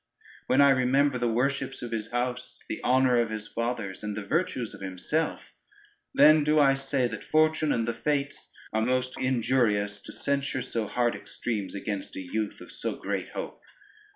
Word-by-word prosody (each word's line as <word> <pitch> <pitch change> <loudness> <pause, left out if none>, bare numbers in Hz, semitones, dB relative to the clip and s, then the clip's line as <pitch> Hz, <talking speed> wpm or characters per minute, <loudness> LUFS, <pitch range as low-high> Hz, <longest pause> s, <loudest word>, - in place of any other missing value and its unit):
When 130 +2 +4
I 140 -1 +7
remember 135 +1 +3
the 120 - +1
worships 135 +2 -1
of 120 - -5
his 110 -1 -3
house, 125 +1 -3
the - - -4
honor 125 -1 +4
of 115 - -1
his 110 -1 -5
fathers, 115 -5 -3
and 105 -1 -3
the 105 - -4
virtues 125 - -1
of - - -11
himself, 95 - -2 0.6
then 155 - +6
do 150 +1 +3
I 140 -2 +6
say, 135 -2 0
that 110 -3 -6
fortune 155 -1 +2
and 115 0 0
the 115 - 0
fates 140 +2 -2 0.2
are 110 - +2
most 130 +2 0
injurious, 115 -5 +1
to - - -10
censure 140 -2 -1
so 115 -4 -2
hard 120 -1 +1
extremes, 105 -6 -4
against 100 0 -4
a - - -4
youth 105 +3 -3
of - - -11
so - - -4
great - - -3
hope. - - -5
125 Hz, 180 wpm, -28 LUFS, 110-140 Hz, 0.6 s, I